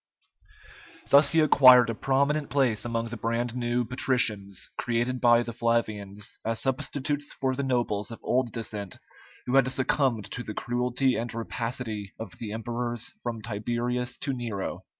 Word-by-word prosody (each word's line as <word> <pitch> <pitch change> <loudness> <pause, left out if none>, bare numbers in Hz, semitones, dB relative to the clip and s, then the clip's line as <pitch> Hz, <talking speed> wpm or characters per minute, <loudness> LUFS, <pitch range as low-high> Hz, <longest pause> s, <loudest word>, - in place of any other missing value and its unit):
Thus 140 0 +7
he 165 - +4
acquired 130 -6 +7
a - - -3
prominent 140 +5 +1
place 125 -6 +1
among 115 -1 -2
the 120 - -5
brand 115 +2 -1
new 120 0 0
patricians 110 -6 -1
created 120 +1 -1
by 120 -1 +5
the 120 - -6
Flavians 105 -4 -2
as 115 0 -1
substitutes 145 +2 -1
for 130 -1 -1
the 135 - -2
nobles 120 -6 -1
of 115 - -8
old 125 -1 +1
descent 105 -4 -5 0.5
who 125 +2 +2
had 135 -2 +5
succumbed 130 -4 0
to 125 - -4
the 110 -3 -7
cruelty 125 +2 0
and 120 +1 -3
rapacity 115 -2 -4
of 115 - -8
the 110 -3 -5
emperors 120 +3 -3
from 115 -2 -4
Tiberius 120 +3 -2
to 140 - 0
Nero. 115 -6 -4
120 Hz, 150 wpm, -27 LUFS, 115-130 Hz, 0.5 s, Thus